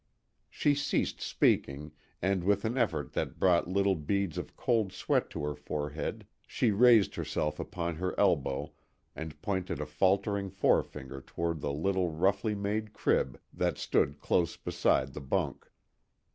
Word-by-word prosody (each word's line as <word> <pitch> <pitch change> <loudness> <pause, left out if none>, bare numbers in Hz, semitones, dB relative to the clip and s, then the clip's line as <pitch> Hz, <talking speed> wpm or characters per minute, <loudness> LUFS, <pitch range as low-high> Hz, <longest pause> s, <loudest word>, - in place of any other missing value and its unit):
She 145 - +2
ceased 145 +1 -1
speaking, 75 +3 +1 0.3
and 95 -1 +1
with 100 +3 +2
an 115 +3 -1
effort 80 - 0
that - - -2
brought 90 -3 +4
little 100 +1 +2
beads 95 +2 -1
of - - -8
cold 110 -6 +1
sweat - - 0
to - - -5
her 75 0 -1
forehead, 75 +1 -4 0.2
she 115 - +1
raised 115 0 +6
herself 75 0 -2
upon 85 -2 -3
her 90 +2 -2
elbow 75 -9 +1 0.4
and 80 -2 -7
pointed 95 -6 -2
a 75 - -2
faltering 95 +6 +1
forefinger 70 -7 0
toward 85 +3 -3
the 70 - -1
little 90 +4 0
roughly 95 +6 +1
made 105 +2 -2
crib 65 - +1
that - - 0
stood 70 +1 +1
close 85 +3 +1
beside 65 0 +1
the 75 - -6
bunk. 65 - -2
90 Hz, 145 wpm, -30 LUFS, 75-100 Hz, 0.4 s, raised